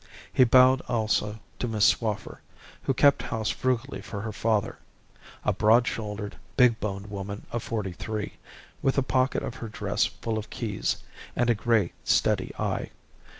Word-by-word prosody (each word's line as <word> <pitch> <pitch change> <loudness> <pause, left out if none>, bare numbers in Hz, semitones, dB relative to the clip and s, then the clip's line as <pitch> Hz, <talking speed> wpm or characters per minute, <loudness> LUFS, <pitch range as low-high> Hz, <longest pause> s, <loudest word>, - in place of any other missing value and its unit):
He 130 - +6
bowed 130 +2 +6
also 110 -3 0 0.2
to 125 - -1
Miss 110 -3 +2
Swaffer, 105 -3 0 0.4
who - - 0
kept 140 +1 +5
house 110 -2 -2
frugally 130 +1 -1
for 100 -2 -6
her 110 +1 -4
father 110 -1 0 0.7
a - - +3
broad 115 +3 +5
shouldered, 105 -3 -4 0.2
big 125 -3 +5
boned 100 -1 -3
woman 100 0 -5
of 120 - -2
forty 105 -5 -3
five, 105 +3 -4 0.5
with 135 - +2
the 140 - +2
pocket 130 +1 +1
of 130 -4 -4
her 115 - -6
dress 105 - 0
full 110 -1 -3
of 110 - -8
keys, 105 -5 -2 0.3
and 120 -1 +3
a - - +5
grey, 110 -4 +1
steady - - +2
eye. - - -2
110 Hz, 160 wpm, -27 LUFS, 105-125 Hz, 0.7 s, He